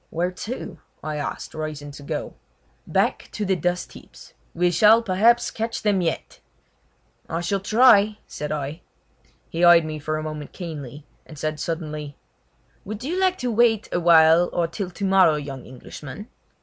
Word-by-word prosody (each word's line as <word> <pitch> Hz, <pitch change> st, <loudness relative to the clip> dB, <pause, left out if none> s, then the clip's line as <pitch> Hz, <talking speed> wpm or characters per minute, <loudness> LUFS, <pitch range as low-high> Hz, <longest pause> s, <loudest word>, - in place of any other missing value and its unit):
"Where 175 Hz, +2 st, -1 dB
to?" 200 Hz, -2 st, -7 dB, 0.2 s
I 155 Hz, -1 st, -3 dB
asked, 145 Hz, -, -5 dB
rising 155 Hz, -2 st, -5 dB
to 145 Hz, -, -11 dB
go. 140 Hz, -, -5 dB, 0.5 s
"Back -, -, 0 dB
to 210 Hz, -, -3 dB
the 190 Hz, 0 st, +2 dB
dust 180 Hz, 0 st, -2 dB
heaps. -, -, -15 dB, 0.2 s
We 175 Hz, +1 st, +2 dB
shall, 215 Hz, +6 st, +5 dB
perhaps, 230 Hz, +4 st, +3 dB
catch 225 Hz, +1 st, -4 dB
them 205 Hz, -3 st, +2 dB
yet!" 165 Hz, -2 st, -3 dB, 0.9 s
"I 165 Hz, +1 st, -2 dB
shall 195 Hz, +3 st, -1 dB
try!" 215 Hz, 0 st, +5 dB
said 150 Hz, 0 st, -6 dB
I. 150 Hz, +2 st, -4 dB, 0.7 s
He 170 Hz, +2 st, -3 dB
eyed 170 Hz, -2 st, +7 dB
me 155 Hz, -1 st, -5 dB
for 155 Hz, +1 st, -2 dB
a 155 Hz, -, -4 dB
moment 155 Hz, -2 st, -6 dB
keenly, 150 Hz, -5 st, -8 dB, 0.2 s
and 155 Hz, -, -12 dB
said 155 Hz, +1 st, -3 dB
suddenly: 155 Hz, -3 st, -5 dB, 0.7 s
"Would 215 Hz, +3 st, -7 dB
you 340 Hz, +7 st, -2 dB
like 375 Hz, -1 st, +2 dB
to 245 Hz, -, 0 dB
wait 225 Hz, -1 st, +2 dB
a -, -, 0 dB
while 165 Hz, 0 st, +6 dB
or 175 Hz, -, 0 dB
till 185 Hz, +2 st, -5 dB
tomorrow, 190 Hz, -3 st, +3 dB
young 140 Hz, -3 st, -6 dB
Englishman?" 145 Hz, -, -10 dB
175 Hz, 160 wpm, -23 LUFS, 155-205 Hz, 0.9 s, eyed